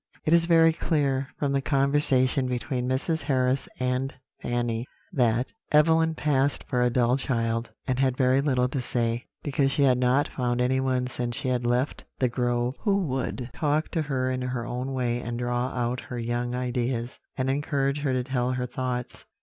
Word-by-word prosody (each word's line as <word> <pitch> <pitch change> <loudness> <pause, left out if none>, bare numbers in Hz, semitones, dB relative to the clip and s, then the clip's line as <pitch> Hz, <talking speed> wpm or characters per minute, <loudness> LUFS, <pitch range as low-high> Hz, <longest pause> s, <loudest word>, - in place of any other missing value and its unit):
"It 155 - +3
is 170 0 +5
very 165 -1 +5
clear, 140 -5 0
from 140 -2 0
the 140 0 +1
conversation 135 -2 +2
between 125 0 -2
Mrs. 160 +5 0
Harris 130 -1 +1
and 125 +1 0 0.3
Fanny, 120 0 -1 0.3
that 125 -3 +1 0.2
Evelyn 160 +1 +4
passed 145 -2 +1
for 125 -3 -1
a 125 - +4
dull 120 +1 +2
child, 115 -2 -1 0.2
and 130 0 -1
had 130 -2 +2
very 130 +1 +3
little 130 -3 +2
to 135 0 -2
say, 120 -1 -1 0.2
because 140 -1 +1
she 140 - +2
had 130 -2 +4
not 125 +3 +3
found 120 -1 -1
anyone 130 0 +1
since 120 -1 -3
she 130 - -2
had 125 -1 0
left 125 +4 0
The 125 - +2
Grove 120 +1 0
who 200 -3 +2
would 130 -1 -3
talk 150 0 0
to 165 - -1
her 130 -4 -1
in 130 0 -2
her 125 -2 -3
own 125 +2 -3
way 120 -2 -1
and 120 0 -4
draw 120 +1 -1
out 125 -1 -2
her 125 -2 -7
young 120 +1 -2
ideas, 125 -1 -2 0.2
and 130 -1 0
encourage 140 0 0
her 145 -2 0
to 130 -1 0
tell 125 -1 -1
her 125 0 -1
thoughts. 125 0 -4
130 Hz, 180 wpm, -26 LUFS, 125-140 Hz, 0.3 s, is